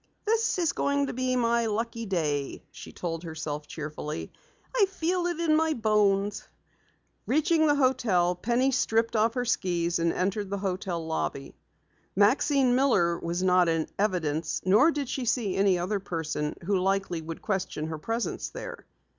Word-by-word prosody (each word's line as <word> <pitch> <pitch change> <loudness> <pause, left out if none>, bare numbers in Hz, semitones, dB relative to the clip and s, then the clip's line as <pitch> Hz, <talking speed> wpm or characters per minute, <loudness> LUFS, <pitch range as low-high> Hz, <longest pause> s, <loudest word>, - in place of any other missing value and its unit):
"This 450 0 +1
is 340 -4 +2
going 280 0 +1
to - - -4
be 255 0 0
my 235 -1 +2
lucky 230 +1 -3
day," 150 -7 -2
she - - -10
told 165 -2 -4
herself 155 -3 -5
cheerfully. 150 0 -6 0.4
"I 415 -5 +4
feel 360 -1 -1
it 345 -2 -3
in 325 -2 +3
my 320 0 +2
bones." 210 -2 +1 0.8
Reaching 315 +3 +3
the 290 - +4
hotel, 235 -10 +2
Penny 240 +8 +1
stripped 230 -3 +1
off 225 +2 +2
her 245 -1 -1
skis 175 -6 0
and 165 0 +2
entered 195 +2 -1
the 200 - -2
hotel 185 -3 -3
lobby. 150 -3 -3 0.6
Maxine 255 +5 +3
Miller 200 -11 +3
was 170 +2 -2
not 180 -2 +4
in 165 -1 0
evidence 165 -6 0
nor 215 - +6
did 290 -4 -2
she 260 0 -3
see 220 -5 0
any 195 -2 +3
other 190 +4 -1
person 160 -5 -3
who 195 0 +1
likely 190 -2 0
would 160 +1 -8
question 190 -6 -2
her 160 -1 -5
presence 225 +8 -3
there. - - -8
200 Hz, 160 wpm, -27 LUFS, 170-255 Hz, 0.8 s, nor